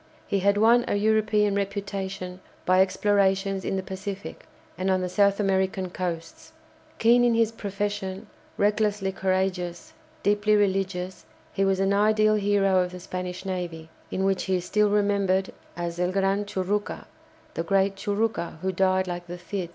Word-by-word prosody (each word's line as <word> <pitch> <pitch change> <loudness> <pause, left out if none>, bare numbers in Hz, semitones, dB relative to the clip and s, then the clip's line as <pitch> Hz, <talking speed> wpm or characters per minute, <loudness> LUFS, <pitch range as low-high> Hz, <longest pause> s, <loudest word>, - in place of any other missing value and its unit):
He 200 - 0
had 200 +2 +2
won 230 +3 +5
a - - 0
European 215 0 +2
reputation 195 -2 -4 0.3
by 185 +1 +5
explorations 195 0 +1
in - - -2
the 190 - -2
Pacific 190 +1 -7 0.3
and 185 +2 -2
on 185 -1 +2
the 180 - -1
South 200 +2 +2
American 190 -1 0
coasts. 165 -3 -5 0.4
Keen 240 +2 +5
in 240 -1 +3
his 225 -1 +2
profession, 200 -2 -4 0.3
recklessly 205 -1 +1
courageous, 185 -2 -2 0.3
deeply 205 +1 +3
religious, 190 -2 -1 0.3
he 195 - +1
was 195 -1 +2
an 195 +1 +2
ideal 215 +1 +3
hero 200 -2 +2
of 180 -1 0
the 180 - -7
Spanish 180 +1 -6
navy, 170 -4 -5 0.2
in 190 - -2
which 195 0 +1
he 190 - +1
is 180 -1 -2
still 210 +2 +2
remembered 200 -2 +1 0.2
as 170 0 -4
"El 180 0 +1
Gran 195 +1 +1
Churucca," 205 +1 -2 0.5
the - - -2
"great 195 +3 +1
Churucca," 205 -3 -2
who 190 - +1
"died 185 0 +2
like 175 0 -5
the 175 +1 -6
Cid." 180 0 -5
195 Hz, 160 wpm, -26 LUFS, 185-205 Hz, 0.5 s, won